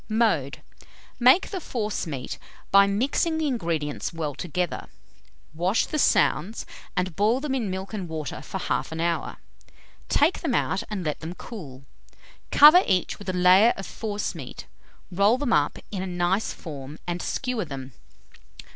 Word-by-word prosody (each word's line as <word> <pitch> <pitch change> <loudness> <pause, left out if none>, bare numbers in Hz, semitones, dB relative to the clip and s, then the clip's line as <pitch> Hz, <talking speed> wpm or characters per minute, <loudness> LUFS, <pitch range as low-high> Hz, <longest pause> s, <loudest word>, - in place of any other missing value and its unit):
Mode. 210 - +1 0.6
Make 255 +10 +5
the 385 - -3
forcemeat 210 - -4 0.3
by 200 0 +7
mixing 270 +10 +1
the 315 - 0
ingredients 165 - -2
well 160 -4 -3
together. 175 +4 -3 0.7
Wash 180 +7 +1
the 305 - -3
sounds, 205 - +2 0.3
and 180 -2 -1
boil 215 +5 +2
them 280 -1 -3
in 235 -6 -1
milk 190 +2 -5
and 190 -5 -4
water 155 -4 -5
for - - -5
1/2 - - -2
an 160 - -5
hour; 170 0 -1 0.7
take 305 +6 +3
them 280 -8 -1
out 185 - 0
and 205 -4 -3
let 150 - -2
them 165 +2 -6
cool. 145 - -9 0.7
Cover 305 +5 +9
each 185 0 0
with 200 -2 -7
a - - 0
layer 185 +6 +6
of 195 - -6
forcemeat, 205 - -5 0.5
roll 200 +6 +4
them 260 -4 0
up 145 0 +2
in 195 -3 -3
a 190 - -3
nice 180 +3 0
form, 145 -2 -8
and 175 0 -3
skewer 250 -6 -2
them. 135 -3 -7
190 Hz, 155 wpm, -25 LUFS, 165-230 Hz, 0.7 s, Cover